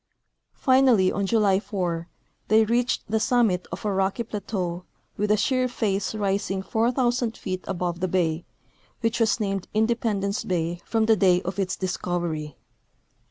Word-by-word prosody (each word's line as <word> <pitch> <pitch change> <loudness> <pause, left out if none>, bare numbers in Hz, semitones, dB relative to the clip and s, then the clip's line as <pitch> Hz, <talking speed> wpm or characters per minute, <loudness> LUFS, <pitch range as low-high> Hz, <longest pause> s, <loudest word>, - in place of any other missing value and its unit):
Finally, 255 -8 +4
on 200 -1 -1
July 200 -3 +3
4, 175 -5 -3 0.4
they 220 +1 +5
reached 240 +2 +1
the 220 +1 +1
summit 220 -7 +2
of - - -6
a 205 - +1
rocky 195 +4 0
plateau 185 -5 -4 0.3
with 210 0 -1
a 210 - +4
sheer 255 +4 +1
face 205 -4 -1
rising 195 -2 -1
4,000 240 +2 0
feet 185 -2 -4
above 175 -2 -2
the 185 - 0
bay, 170 -2 0 0.6
which 225 0 0
was 225 0 +2
named 195 -3 -2
Independence 215 -3 0
bay 175 -1 -2
from 225 -1 +1
the 220 0 +5
day 180 -2 +4
of 190 +3 -4
its 190 -2 0
discovery. 170 -5 -3
200 Hz, 150 wpm, -25 LUFS, 185-225 Hz, 0.6 s, they